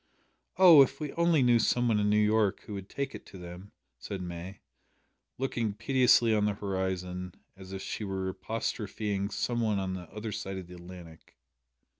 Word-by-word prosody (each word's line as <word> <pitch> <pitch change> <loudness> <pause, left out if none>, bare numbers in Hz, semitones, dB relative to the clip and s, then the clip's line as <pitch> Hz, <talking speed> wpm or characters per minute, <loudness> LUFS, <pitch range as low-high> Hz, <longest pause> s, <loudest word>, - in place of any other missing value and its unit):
"Oh! 175 -6 +9
if 135 0 +2
we 150 -2 -4
only 170 -4 +3
knew 120 -1 +5
some 120 +2 +2
one 110 -2 +2
in 105 0 +2
New 105 - +3
York 105 -1 +2
who 105 - -9
would 100 -1 -7
take 140 -1 -3
it - - -8
to 95 - -11
them," 90 +2 -10 0.3
said 100 - -5
May, 90 +2 -7 0.8
looking 120 -5 -2
piteously 120 0 +4
at 105 - +2
the 105 -1 +1
horizon, 95 -2 -3 0.2
as 95 0 -12
if 95 0 -6
she - - -4
were 95 -2 -3
apostrophising 100 0 -3
some 120 +2 -1
one 110 -3 +1
on 95 -1 -2
the 90 -2 -7
other 105 +1 -5
side 95 -1 -5
of 95 - -6
the 90 - -13
Atlantic. 85 -2 -12
100 Hz, 185 wpm, -29 LUFS, 95-115 Hz, 0.8 s, Oh